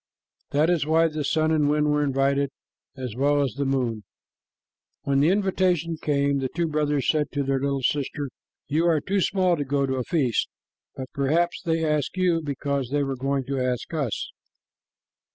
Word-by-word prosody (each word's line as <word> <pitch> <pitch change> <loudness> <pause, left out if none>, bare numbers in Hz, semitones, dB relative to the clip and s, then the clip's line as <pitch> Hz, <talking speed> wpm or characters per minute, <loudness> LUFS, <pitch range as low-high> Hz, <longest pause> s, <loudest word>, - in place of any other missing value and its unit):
That 155 +4 +2
is 170 -4 +2
why 165 +1 +4
the 155 -1 -3
sun 155 +2 +1
and 150 -2 +2
wind 150 0 +2
were 150 0 +2
invited 140 0 +1 0.5
as 125 -4 -5
well 145 +3 +2
as 135 - -2
the 140 0 -2
moon. 125 -5 -1 1.0
When 140 -1 +1
the 150 +4 +4
invitation 185 -4 +1
came, 140 -1 +1
the 130 -1 -2
two 170 0 +1
brothers 150 -3 0
said 150 -2 +2
to 140 -1 0
their 135 0 0
little 140 0 -1
sister, 140 0 -1 0.4
"You 160 +4 +1
are 165 -3 +3
too 195 +6 -1
small 185 -1 +2
to 145 - -1
go 140 0 0
to 130 -1 -2
a 130 - -1
feast, 130 - 0 0.5
but 130 -1 -7
perhaps 160 +6 +1
they 165 -1 0
asked 150 +2 -1
you 180 -3 +2
because 140 -3 -2
they 145 +1 +1
were 135 -1 -2
going 135 +1 -1
to 135 +1 -3
ask 125 +3 -2
us." 140 -8 -2
145 Hz, 185 wpm, -25 LUFS, 135-160 Hz, 1.0 s, why